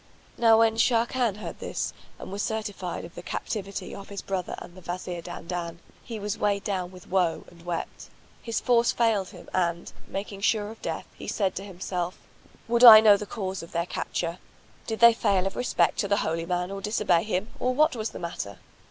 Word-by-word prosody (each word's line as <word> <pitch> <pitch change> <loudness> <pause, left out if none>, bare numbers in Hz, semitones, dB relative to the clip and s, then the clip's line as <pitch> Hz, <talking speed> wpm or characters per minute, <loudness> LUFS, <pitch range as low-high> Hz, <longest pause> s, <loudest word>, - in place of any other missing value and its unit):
Now 225 -1 +5
when 225 0 +4
Sharrkan 235 -1 +2
heard - - -7
this - - -3 0.2
and - - -9
was 200 +1 -3
certified 210 -7 -3
of 170 - -12
the - - -8
captivity 200 +2 -4
of 195 - -9
his 200 -1 -6
brother 190 -2 -3
and 175 - -10
the 185 - -13
Wazir 175 0 -5
Dandan, 170 0 -5 0.3
he 230 - -6
was 205 0 -3
weighed 200 -1 +1
down 185 -3 -2
with 185 -1 -14
woe 180 -4 +1
and 170 -1 -17
wept; 175 -1 -5 0.3
his 230 -2 -2
force 240 -1 +3
failed 220 -5 +1
him - - -13
and, 170 -2 -1
making 195 0 -5
sure 210 0 +1
of 225 - -13
death, - - -4
he - - -10
said 195 -3 0
to 195 - -4
himself, 180 -2 -4 0.5
"Would 235 +1 +2
I 225 -3 +13
knew 215 -2 +7
the 205 +1 -5
cause 190 -3 -4
of 165 - -11
their 170 0 0
capture! 170 -1 -3 0.5
Did 220 0 -3
they 235 0 +9
fail 195 -4 +1
of 195 - -2
respect 245 - +1
to 200 - +1
the 200 0 +2
holy 165 +1 -2
man 180 +1 -1
or 195 0 -5
disobey 200 -4 +2
him, 210 +1 -2
or 255 0 0
what 305 0 +4
was 220 -1 -2
the - - -9
matter?" 135 - -5
195 Hz, 205 wpm, -27 LUFS, 180-220 Hz, 0.5 s, I